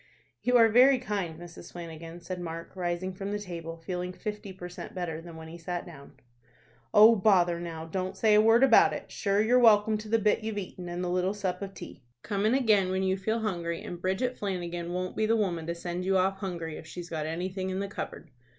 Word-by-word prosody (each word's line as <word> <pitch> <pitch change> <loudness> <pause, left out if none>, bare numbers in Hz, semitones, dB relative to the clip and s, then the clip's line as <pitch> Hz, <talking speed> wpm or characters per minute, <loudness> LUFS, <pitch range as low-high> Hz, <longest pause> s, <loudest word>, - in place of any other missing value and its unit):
"You 250 0 +4
are 230 -1 +7
very 255 +4 +6
kind, 195 -9 -3
Mrs. 175 0 -11
Flanagan," 165 0 -8
said 180 0 -5
Mark, 165 +1 -7
rising 180 +1 -2
from 195 +2 -5
the 205 - -1
table, 170 -4 -7
feeling 180 +2 -4
fifty 210 0 -6
per 180 -1 -8
cent. 180 0 -9
better 165 -3 -3
than 170 -1 -11
when 160 0 -9
he 170 +2 -10
sat 175 +1 -4
down. 150 -5 -12 0.8
"Oh 220 +2 +8
bother 185 -4 +3
now, 165 -2 -6
don't 185 +3 -4
say 220 -1 +4
a 210 - +7
word 225 +3 +5
about 270 - +6
it! - - -7
Shure 200 -1 0
you're 245 +3 +4
welcome 215 -2 +5
to 215 0 -9
the 225 - +4
bit 215 +1 +1
you've 220 -1 -3
eaten, 180 -2 -6
and 175 +1 -3
the - - -1
little 185 +2 0
sup 195 -2 -3
of 195 -1 -6
tea. - - -10 0.2
Come 205 0 0
in 235 - +3
again 215 -8 +3
when 190 +1 0
you 190 0 +2
feel 220 +4 -1
hungry 170 -5 -2
and 175 0 -7
Bridget 200 +8 0
Flanagan 175 -3 -3
won't 185 +1 -3
be 215 - +1
the 225 - +3
woman 175 -6 -1
to 170 - -2
send 175 +1 -4
you 190 +1 +2
off 190 +1 +1
hungry 170 -5 -4
if 160 - -11
she's 175 +1 -8
got 155 -2 -2
anything 185 +3 -3
in 185 0 -2
the 200 - -2
cupboard." 195 - -7
185 Hz, 230 wpm, -29 LUFS, 175-210 Hz, 0.8 s, Oh